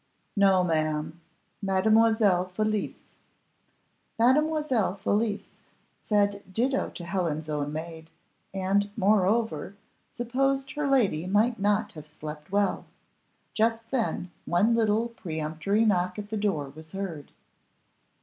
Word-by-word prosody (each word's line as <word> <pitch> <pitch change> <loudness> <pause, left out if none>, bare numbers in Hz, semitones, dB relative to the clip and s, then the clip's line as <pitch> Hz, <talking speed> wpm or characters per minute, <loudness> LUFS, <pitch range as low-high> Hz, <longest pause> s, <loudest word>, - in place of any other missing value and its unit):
"No, 195 -2 +4
ma'am, 155 -1 -1 0.4
Mademoiselle 210 -1 +3
Felicie." 215 +3 -2 1.2
Mademoiselle 265 - +2
Felicie 205 +1 -1 0.5
said 205 -1 +1
ditto 255 +7 0
to 175 - -7
Helen's 170 -4 -2
own 145 -1 -2
maid, 160 +1 -7 0.4
and, 195 +2 +1
moreover, 200 -2 +1 0.3
supposed 270 +3 -1
her 295 0 -2
lady 200 - +2
might 215 +4 +2
not 210 +2 +1
have 155 -4 -11
slept 150 +1 -9
well. 200 0 +1 0.7
Just 225 +1 0
then, 225 -8 -1
one 200 +7 +3
little 225 0 +2
peremptory 160 +1 -1
knock 185 -3 +1
at 210 0 -7
the - - -1
door 190 -9 -1
was 160 +2 -11
heard. 180 -7 -5
200 Hz, 110 wpm, -27 LUFS, 170-225 Hz, 1.2 s, No